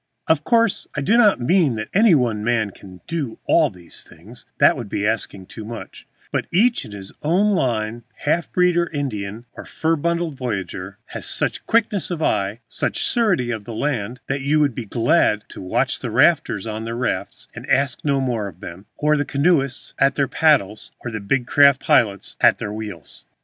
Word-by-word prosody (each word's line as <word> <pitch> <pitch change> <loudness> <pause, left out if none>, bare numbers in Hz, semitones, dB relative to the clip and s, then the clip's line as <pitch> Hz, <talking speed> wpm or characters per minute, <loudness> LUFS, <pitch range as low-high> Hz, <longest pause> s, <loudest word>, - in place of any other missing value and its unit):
Of 160 -2 +2
course 230 +3 +2
I 140 - -1
do 205 +11 +2
not 215 - +5
mean 150 0 +2
that 110 0 -5
any 200 -2 +5
one 115 -6 0
man 110 -3 +1
can 90 -1 -14
do 150 -9 -4
all 160 -3 +4
these 90 -3 -6
things, 115 +9 -15
that 140 - +5
would 120 -6 -7
be 100 - -2
asking 105 -3 -2
too 110 - -9
much, 115 +2 -9 0.2
but - - -2
each 230 +7 +2
in - - -11
his 100 -2 -9
own 190 +7 +2
line, 115 - -1
half 165 +3 -1
breed 180 -1 +3
or 170 -1 +1
Indian 115 -7 -4
or - - -9
fur 160 +1 -1
bundled 170 0 -1
voyageur, 95 -5 -4 0.2
has - - -4
such - - -1
quickness 215 -4 +1
of 175 -3 -3
eye, 105 -7 0
such - - -2
surety 190 - +1
of 110 -3 -5
hand, 120 -1 -3
that 135 0 -2
you 145 +3 +2
will 145 -1 +4
be 120 -2 -6
glad 115 0 +2
to - - -10
watch 90 - -1
the - - -4
rafters 95 - +2
on 110 0 -4
their 115 +1 -4
rafts, 125 - -3
and - - -10
ask 135 0 +1
no 140 -2 +1
more 120 -6 -1
of 90 -3 -11
them, 90 +4 -10
or 150 +1 +2
the 145 - +1
canoeists 140 -2 0
at 135 0 +3
their 140 -1 +1
paddles, 130 -12 +1
or 120 - -3
the 110 - -4
big 120 +5 0
craft 140 0 +5
pilots 100 -4 +1
at - - +5
their 105 - -5
wheels. 105 -7 -8
125 Hz, 195 wpm, -21 LUFS, 110-155 Hz, 0.2 s, not